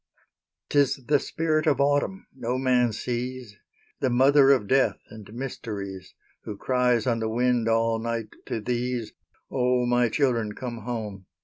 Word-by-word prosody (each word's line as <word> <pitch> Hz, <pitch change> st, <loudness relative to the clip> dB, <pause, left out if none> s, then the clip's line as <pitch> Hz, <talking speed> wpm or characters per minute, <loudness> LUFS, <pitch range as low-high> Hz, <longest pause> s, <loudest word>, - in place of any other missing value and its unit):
'Tis 140 Hz, -2 st, +2 dB
the 145 Hz, +1 st, +3 dB
Spirit 155 Hz, 0 st, -1 dB
of 145 Hz, -, +3 dB
Autumn, 145 Hz, +7 st, +1 dB
no 125 Hz, -1 st, -2 dB
man 125 Hz, -2 st, +2 dB
sees, 120 Hz, 0 st, -4 dB, 0.4 s
The 130 Hz, -, +1 dB
mother 135 Hz, +3 st, +5 dB
of 130 Hz, -6 st, +4 dB
Death 135 Hz, +3 st, +3 dB
and 110 Hz, -2 st, -11 dB
Mysteries, 105 Hz, -7 st, -6 dB, 0.3 s
Who 105 Hz, -, -7 dB
cries 125 Hz, -2 st, +1 dB
on 115 Hz, -2 st, +1 dB
the 110 Hz, 0 st, -1 dB
wind 120 Hz, 0 st, +1 dB
all 115 Hz, 0 st, +2 dB
night 115 Hz, -1 st, -3 dB, 0.2 s
to -, -, -2 dB
these, 120 Hz, 0 st, -2 dB, 0.4 s
"O, 125 Hz, -1 st, +1 dB
my 120 Hz, -1 st, +2 dB
children, 115 Hz, -5 st, 0 dB
come 120 Hz, -3 st, -5 dB
home!" 105 Hz, -6 st, -5 dB
125 Hz, 145 wpm, -26 LUFS, 115-130 Hz, 0.4 s, mother